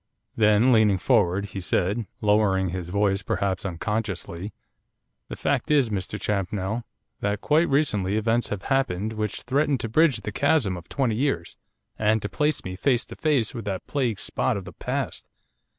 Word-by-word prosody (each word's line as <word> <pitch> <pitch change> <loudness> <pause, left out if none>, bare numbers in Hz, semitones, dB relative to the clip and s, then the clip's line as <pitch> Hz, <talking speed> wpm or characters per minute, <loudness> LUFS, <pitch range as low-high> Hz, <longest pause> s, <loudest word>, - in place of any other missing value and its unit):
Then, 105 +3 +4
leaning 110 -4 +5
forward, 90 +2 +2
he 95 - -5
said, 100 +5 0 0.2
lowering 105 -3 +3
his 90 -1 -5
voice 100 0 +1
perhaps 95 0 -1
unconsciously, 95 0 -3 0.8
'The - - -6
fact - - -1
is, 140 -7 +3
Mr 105 +1 -3
Champnell, 100 +2 -2 0.4
that 105 0 -1
quite 155 +3 +3
recently 105 -9 +1
events 115 +1 +1
have 105 -2 -4
happened 110 -6 0
which 105 -2 -3
threaten 145 +1 +1
to 115 - -4
bridge 135 -1 +3
the 105 - -4
chasm 135 -5 +2
of 85 -1 -10
twenty 130 -5 0
years, 130 -11 -1 0.4
and 110 +1 +3
to 105 - -2
place 150 -1 0
me 90 0 -5
face 125 +4 +1
to - - -10
face 140 -7 +1
with 115 -4 -6
that 95 -2 -3
plague 125 - -1
spot - - -1
of 95 - -7
the 90 - -9
past. - - -4
105 Hz, 165 wpm, -25 LUFS, 95-125 Hz, 0.8 s, leaning